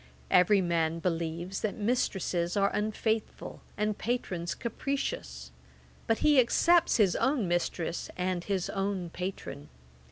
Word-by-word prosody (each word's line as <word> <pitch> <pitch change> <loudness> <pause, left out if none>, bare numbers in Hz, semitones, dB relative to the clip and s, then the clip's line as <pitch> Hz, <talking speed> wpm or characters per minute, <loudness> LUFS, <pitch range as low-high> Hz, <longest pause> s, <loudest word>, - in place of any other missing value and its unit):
Every 190 +2 +5
man 165 -2 0
believes 170 +2 -2
that 215 - -1
mistresses 195 -5 0
are 200 0 +3
unfaithful, 215 +1 -2 0.2
and 210 0 0
patrons 185 -8 -2
capricious; 205 - -4 0.6
but 225 - +2
he 295 -3 +6
excepts 335 +8 +4
his 200 -5 +3
own 265 -7 +1
mistress, 175 -1 -2
and 180 -1 -1
his 190 -2 -1
own 195 -3 -2
patron. 180 -6 -6
190 Hz, 120 wpm, -29 LUFS, 170-220 Hz, 0.6 s, he